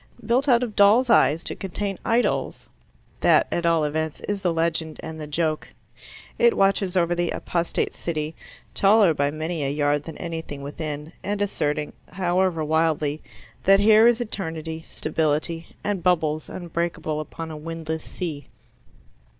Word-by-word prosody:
"Built 255 +6 +2
out 245 -1 +5
of 225 -4 -4
doll's 220 +5 +5
eyes 150 - +4
to - - -3
contain 195 0 -4
idols" 235 +2 0 0.5
that, - - +5
at 170 0 0
all 165 -2 +3
events, 155 +1 -2
is 205 -1 -3
the 180 -3 +1
legend 165 -1 -1
and 160 -1 -7
the 150 - -6
joke. 155 +1 -1 0.7
It 235 0 +4
watches 195 -1 +2
over 175 -1 +2
the 175 -1 0
apostate 170 -1 -1
city, 155 -2 -3 0.4
taller 200 -3 +5
by 145 -1 +1
many 155 +1 -3
a 135 - 0
yard 145 0 0
than 165 - -8
anything 160 -4 -6
within, 150 +2 -6
and 205 +1 -2
asserting, 150 -7 -1 0.2
however 180 -2 +1
wildly, 155 -1 +1 0.4
that 195 +1 +6
here 215 +2 +6
is 240 0 +4
eternity, 160 -8 -4
stability, 155 +1 -1 0.2
and 200 -3 -1
bubbles 160 -4 +1
unbreakable 170 -3 -3
upon 160 +1 -6
a - - -6
windless 160 0 -5
sea. 155 -6 -5
165 Hz, 150 wpm, -24 LUFS, 155-195 Hz, 0.7 s, that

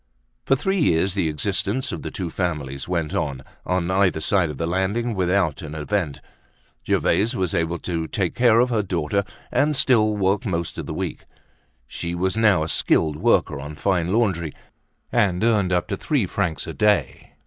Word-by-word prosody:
For 135 - +5
three 190 +8 0
years 95 - +2
the 95 -5 0
existence 105 - -1
of - - -5
the - - -5
two 90 -5 -5
families 75 -7 -3
went 85 -4 -1
on, 65 -2 -2 0.2
on 90 -1 0
either 95 -3 +2
side 85 +1 +2
of 75 - -6
the 85 - -2
landing, 95 +7 0
without 90 -6 +1
an 75 -1 -7
event. 80 -1 -2 0.7
Gervaise 115 +5 +2
was 95 -5 -1
able 85 +1 0
to 80 -1 -3
take 95 -2 -1
care 120 -2 +4
of 125 +1 +3
her 110 -2 +2
daughter 95 0 -1 0.3
and 145 +4 +2
still 110 -6 +3
work 100 +3 +1
most 85 -6 -3
of - - -5
the - - -4
week. - - -4 0.6
She 85 +7 -5
was 95 +2 -1
now 105 -8 +4
a - - -3
skilled 80 -2 +1
worker 75 - +2
on 75 +2 -7
fine 90 +1 0
laundry 95 -8 +1 0.6
and 95 -1 +2
earned 105 -5 +2
up 90 -1 +1
to 100 - -2
three 135 -3 0
francs 90 -3 -2
a - - -6
day. 105 -1 0
95 Hz, 180 wpm, -23 LUFS, 80-105 Hz, 0.7 s, For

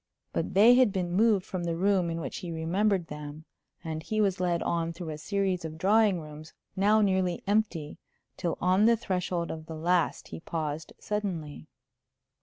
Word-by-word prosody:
But - - -2
they 220 +5 +8
had 250 -4 +5
been 180 -3 -2
moved 205 -1 +3
from 185 -2 -4
the 170 -1 -1
room 185 -1 +2
in 165 0 -3
which 140 -5 -5
he 175 - -6
remembered 180 +4 0
them, 150 0 -8 0.4
and 160 -2 -4
he 215 +6 -3
was 195 -3 +2
led 175 -2 0
on 170 0 -1
through 170 -1 -7
a 150 - -5
series 195 0 -1
of 160 -1 -6
drawing 205 +1 +3
rooms, 155 0 -10 0.2
now 210 +3 +4
nearly 190 -3 +1
empty, 200 -7 -1 0.4
till 170 - -2
on 185 +3 +3
the 230 0 +5
threshold 180 -5 -2
of 160 0 -8
the 160 - -6
last 170 +2 0
he - - -7
paused 160 -1 -4
suddenly. 170 - -4
180 Hz, 180 wpm, -28 LUFS, 160-200 Hz, 0.4 s, they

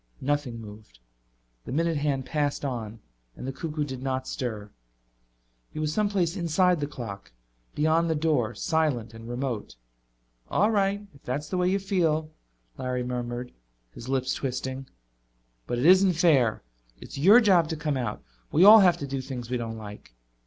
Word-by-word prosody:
Nothing 135 -4 -2
moved. 105 - -12 0.7
The - - -7
minute 165 +3 +1
hand 140 -3 -1
passed 145 -1 -1
on 115 -4 -5 0.3
and - - -8
the 135 - -2
cuckoo 150 +2 -3
did 130 -3 -6
not 130 -1 -2
stir. 110 -5 -4 1.0
He - - -11
was 155 0 -1
someplace 200 -4 0
inside 180 0 +2
the 145 - -2
clock, 115 -8 -8 0.4
beyond 160 +2 +2
the 160 - +1
door, 145 -8 0
silent 135 -5 0
and 115 +1 -10
remote. 120 - -4 0.7
"All 210 +3 +2
right, 200 0 0
if 140 - -19
that's 145 +4 -4
the 185 - -2
way 180 0 +2
you 195 - +2
feel," 165 -6 0 0.5
Larry 125 -1 -2
murmured, 125 0 -4 0.4
his 120 - -9
lips 130 -1 0
twisting. 130 0 -4 0.8
"But 120 - -2
it 125 - 0
isn't 185 +1 +6
fair. 140 - +3 0.4
It's - - -9
your 200 - +8
job 185 -8 +4
to 160 - -2
come 150 -2 -2
out. 120 -5 -3 0.3
We 165 - +4
all 220 +2 +11
have 180 -4 +5
to - - -2
do 135 -1 -3
things 125 -2 -7
we 125 - +1
don't 115 -1 -5
like." 105 - -11
140 Hz, 165 wpm, -26 LUFS, 120-165 Hz, 1.0 s, all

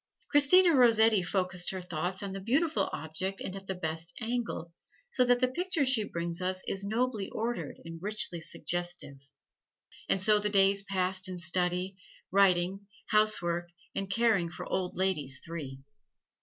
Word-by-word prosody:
Christina 330 +5 +6
Rossetti 225 -5 +5
focused 180 -1 -2
her 190 - -3
thought 180 +2 -3
on 200 - -4
the 195 - -4
beautiful 240 - +1
object 185 +5 -4
and 190 - -5
at 195 0 -9
the 190 - -2
best 165 -1 -4
angle, 230 -8 -3 0.4
so 255 - +3
the 245 0 +4
picture 330 +2 -1
she 255 -4 +3
brings 170 -2 -3
us 185 0 -1
is 195 - -2
nobly 220 -1 -1
ordered 235 +2 -3
and 165 0 -8
richly 200 -4 -2
suggestive. 175 -3 -3 0.9
And 195 - +3
so 210 +2 +4
the 210 0 0
days 195 0 +4
passed 185 -1 -1
in 185 - -5
study, 180 +2 -1 0.3
writing, 195 0 +3 0.2
housework, 175 -5 +1 0.2
and 195 -1 -3
caring 215 -5 +2
for 170 - -8
old 185 -1 -2
ladies 150 -8 0
three. 145 -6 -7
190 Hz, 150 wpm, -30 LUFS, 175-215 Hz, 0.9 s, Christina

